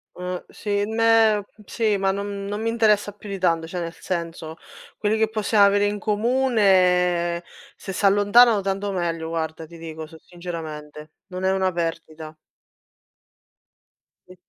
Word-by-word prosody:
Eh, 180 0 -5
sì, 205 -1 -2
meh 225 -1 +3 0.2
sì, 215 -3 0
ma 195 0 +1
non 200 0 -4
non 205 +2 -4
mi 230 - -1
interessa 210 -3 +2
più 205 0 -12
di 195 -1 -5
tanto 165 -2 +1
cioè, 175 +1 -5
nel 170 0 -5
senso 165 -2 -5 0.4
quelli 215 +1 +1
che 220 0 +2
possiamo 215 -1 +3
avere 200 +1 +3
in 205 0 -2
comune 190 -7 +2 0.3
se 190 - -7
s'allontanano 205 +3 +5
tanto 195 +1 -2
meglio 165 -3 -2
guarda, 160 -1 -4
ti 170 +1 -14
dico 160 -1 -7
s 160 +1 -15
sinceramente, 155 -3 -8 0.2
non 185 0 -6
è 190 - +3
una 190 -1 +1
perdita. 160 -2 -5 1.9
Sì. 185 - -14
190 Hz, 145 wpm, -23 LUFS, 170-205 Hz, 1.9 s, s'allontanano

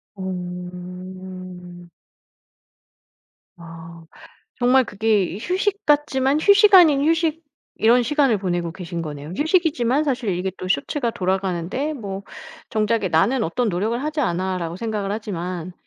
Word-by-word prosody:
어. 180 -1 -8 1.7
아. 165 0 -11 0.5
정말 255 +1 +4
그게 205 -3 0
휴식 380 - -1
같지만 290 -1 +2
휴식 410 +3 +5
아닌 310 -7 +7
휴식 325 0 +1 0.3
이런 240 +3 +4
시간을 275 -3 +2
보내고 175 -3 -2
계신 170 -1 -6
거네요. 150 -2 -7
휴식이지만 305 - +2
사실 255 -6 -1
이게 190 +1 -2
또 185 - -6
쇼츠가 235 - 0
돌아가는데 190 - -2
뭐 200 -8 -6 0.5
정작에 215 -1 +1
'나는 215 +10 +2
어떤 220 +7 -1
노력을 215 +7 -1
하지 305 0 -2
않아.'라고 180 - -2
생각을 210 -2 -3
하지만 180 -4 -5
200 Hz, 270 characters per minute, -22 LUFS, 180-265 Hz, 1.7 s, 아닌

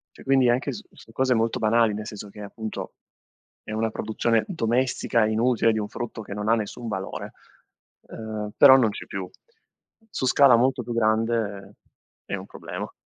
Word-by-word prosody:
Cioè, - - -14
quindi 135 -2 +3
anche 130 +3 +1
su - - -8
su 115 - -17
cose 130 +1 +1
molto 115 0 0
banali, 115 0 +3
nel 105 +1 -5
senso 105 -1 -8
che, 105 +1 -11
appunto, 110 +2 -6 0.7
è - - -8
una 110 +1 0
produzione 110 +1 0
domestica 120 - +1
e 110 - 0
inutile, 115 0 +2
di 110 - -1
un 105 - -3
frutto 120 -1 -6
che 100 - -8
non 105 +1 -4
ha 115 - +5
nessun 115 +2 -5
valore, 95 -3 -5 0.8
ehm, 110 -1 -6
però 135 -2 +9
non 120 -4 +3
c'è - - -8
più. 95 -2 -6 0.8
Su 150 - -3
scala 135 -2 +6
molto 125 +1 +2
più 120 - -5
grande, 110 -3 0 0.5
è - - -3
un - - -7
problema. - - -7
115 Hz, 180 wpm, -25 LUFS, 105-120 Hz, 0.8 s, però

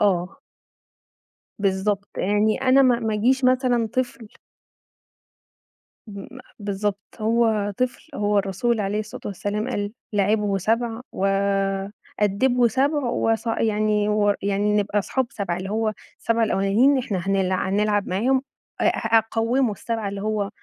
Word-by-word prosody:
آه. 185 -3 0 1.2
بالضبط، 200 +1 0
يعني 210 +4 +1
أنا 265 +1 +5
ما 250 -3 +4
ما 220 -2 -1
أجيش 255 +6 +2
مثلًا 250 -2 +2
طفل 245 -2 -2 1.8
م 200 -2 -8 0.3
بالضبط 205 0 -2 0.2
هو 220 -2 +1
طفل 255 +5 -2
هو 205 0 +2
الرسول 200 +4 -1
عليه 205 +1 -1
الصلاة 215 0 -7
والسلام 205 +4 -3
قال 205 -3 -2 0.2
لاعبه 205 0 +1
7 225 +4 -1
و 195 - -2 0.9
أدبه 240 +4 +3
7 275 +5 +1
وص 225 0 0
يعني 215 -2 +1
و 205 -1 +2
يعني 200 +1 +1
نبقى 205 0 +1
أصحاب 260 +5 -1
7، 185 -4 -3
اللي 185 +1 -5
هو 215 +1 0 0.3
ال7 230 0 +1
الأولانيين 220 +7 +3
إحنا 240 -7 -2
هنل 195 -1 +1
هنلعب 205 +2 0
معاهم 250 +8 +1 0.4
أ - - +2
أ 225 - +2
أقوّمه 225 +3 +1
ال7 220 0 -3
اللي 200 0 -6
هو 210 -1 -1
210 Hz, 130 wpm, -23 LUFS, 200-235 Hz, 1.8 s, أنا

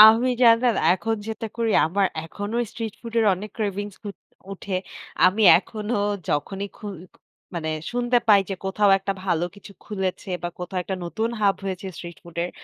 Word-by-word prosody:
আমি 225 +4 +9
জানেন 230 0 +6 0.2
এখন 225 +4 -1
যেটা 220 0 -4
করি, 230 -1 +1 0.2
আমার 195 +4 +2 0.2
এখনও 205 +7 -4
স্ট্রিট 225 -3 -5
ফুড 230 -1 -8
এর 225 - +4
অনেক 205 +4 -8
cravings 205 -1 -3
উ - - -2 0.4
উঠে। 195 -1 -4 0.5
আমি 195 +4 +4 0.2
এখনও 210 +2 -3 0.3
যখনই 195 +7 -1
খুই 205 -2 -7 0.6
মানে 160 -2 -3 0.2
শুনতে 245 0 +2
পাই 200 -2 +8
যে 195 - 0
কোথাও 200 +1 +3
একটা 195 +1 -2
ভালো 170 -3 +1
কিছু 200 0 -13
খুলেছে 190 -2 -3
বা 175 - -1
কোথাও 180 +1 -4
একটা 190 +1 -3
নতুন 220 +6 -1
হাব 200 -2 +4
হয়েছে 190 0 -4
স্ট্রিট 175 -1 -8
ফুড 170 -1 -13
এর, 175 - -4
205 Hz, 170 wpm, -24 LUFS, 190-225 Hz, 0.6 s, আমি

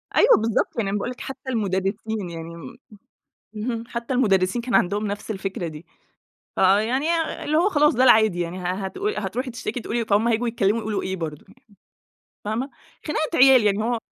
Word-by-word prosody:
أيوَه - - +6
بالضبط، 225 +1 -1
يعني 205 -4 0
أنا 205 - -1
باقول 205 - -3
لِك 250 - -10
حتّى 265 0 -7
المدرِّسين 205 -2 -2
يعني 165 0 -8
م 145 -6 -10 0.8
اهم، 230 +1 -3
حتّى 235 +2 -4
المدرِّسين 200 -2 +2
كان 245 0 -1
عندهُم 205 +3 +1
نفس 205 +2 -4
الفكرة 190 -3 -4
دي. 155 +1 -9 0.7
فيعني 220 +10 +2 0.4
اللي 305 +1 0
هو 370 +5 +3
خلاص، 300 -6 +3
ده 255 +2 +3
العادي 220 -7 +5
يعني. 175 +2 -3
ه - - -7
هتقو 195 - -3
هتروحي 250 - -3
تشتِكي، 235 0 -4
تقولي 230 +1 -2
فهُم 215 +3 +2
هييجوا 235 +1 +1
يتكلَّموا 225 -1 +1
يقولوا 215 -1 -2
إيه 190 0 -3
برضه؟ 155 -4 -6
يعني 205 -3 -23 0.7
فاهمة؟ 235 +6 -2 0.4
خناقة 310 0 -1
عيال 260 -4 +7
يعني. 210 +1 +2
هو 235 0 0
220 Hz, 180 wpm, -23 LUFS, 195-245 Hz, 0.8 s, عيال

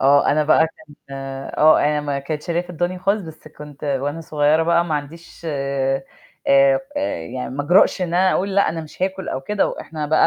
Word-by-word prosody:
آه، 140 +1 +4
أنا 150 +1 +2
بقى 155 +1 +4 0.2
كنت 145 - -16
آه، 135 +3 +2
آآ 150 0 +1
م 145 -1 -2
كانت 150 +2 -4
شارياه 170 -1 -1
في 180 - -12
الدوني 175 +2 -2
خالص، 200 +3 0
بس 160 -2 -11
كنت 150 -1 -11
وأنا 145 +3 -2
صغيرة 155 0 +2
بقى 170 +1 +3
ما 160 -3 -2
عنديش 160 +4 -7
آآ 140 0 -1 0.4
آآ، 275 -1 +5 0.4
يعني 125 +6 -5
ما 145 +2 -3
أجرأش 180 +3 +4
إن - - 0
أنا 185 +1 +4
أقول 195 +1 -1
لأ، 200 - +3
أنا 165 0 -3
مش 155 +3 -10
هاكُل 190 0 -2
أو 130 - -3
كده 205 +9 0
وإحنا 150 0 -5
بقى 155 +1 +4
155 Hz, 205 wpm, -21 LUFS, 145-175 Hz, 0.4 s, آآ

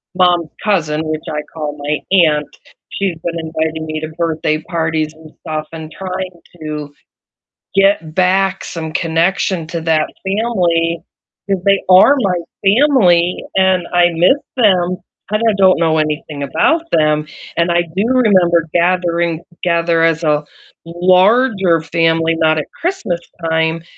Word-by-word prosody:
mom's 175 -3 +2
cousin, 160 -7 0
which 155 0 -4
I 150 0 -2
call 150 -2 -5
my 145 +1 -2 0.3
aunt, 150 -1 0 0.4
she's 190 -4 -3
been 170 -1 -3
inviting 160 0 -3
me 155 0 -4
to 155 - -4
birthday 155 -2 -1
parties 160 -2 -2
and 155 -1 -16
stuff 155 -1 -4
and 160 -1 -8
trying 185 -2 -6 0.2
to 150 -2 -6 0.8
get 195 -5 +2
back 190 +1 +1
some 160 -2 -6
connection 170 +1 0
to 170 0 -4
that 160 -1 +1 0.2
family, 175 -6 0 0.5
'cause 195 -2 -1
they 195 0 +4
are 190 +10 +7
my 195 -7 0 0.3
family, 195 - +3
and 190 -2 +2
I 175 0 +4
miss 180 - +3 0.2
them, 185 -5 +2 0.3
and 215 +1 0
I 220 - +3
don't 190 -3 +4
know 160 -1 +2
anything 150 -1 -3
about 165 - +1
them. 150 -1 +1 0.3
And 170 +1 +2
I 175 0 +2
do 195 - +1
remember 185 -10 +3
gathering 170 -1 +1
together 170 -1 0
as 165 0 +2
a 150 -1 +1 0.4
larger 185 +1 +3
family, 165 0 +1
not 155 -1 +2
at 150 - -2 0.2
Christmastime, 165 - -2
170 Hz, 140 wpm, -16 LUFS, 160-185 Hz, 0.8 s, are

